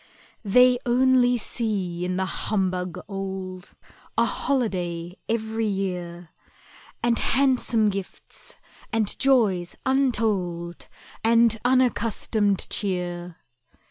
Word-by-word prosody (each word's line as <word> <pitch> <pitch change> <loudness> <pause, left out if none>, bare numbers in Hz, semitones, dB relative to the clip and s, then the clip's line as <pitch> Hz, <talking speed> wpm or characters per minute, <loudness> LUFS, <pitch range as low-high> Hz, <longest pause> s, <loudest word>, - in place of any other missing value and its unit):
They 250 +4 +5
only 250 -1 +3
see 200 -7 -2
in 180 0 -2
the 190 - 0
humbug 185 -3 -1
old 190 -2 -6 0.4
A - - +4
holiday 180 -10 -2
every 220 0 -1
year, 180 -4 -4 0.7
And 235 -1 +2
handsome 245 -5 +2
gifts, 195 -1 -7 0.4
and 220 -3 +1
joys 210 -10 +2
untold, 210 -10 0 0.4
And 230 0 +4
unaccustomed 230 -5 +2
cheer. 180 -3 -2
205 Hz, 85 wpm, -24 LUFS, 180-235 Hz, 0.7 s, They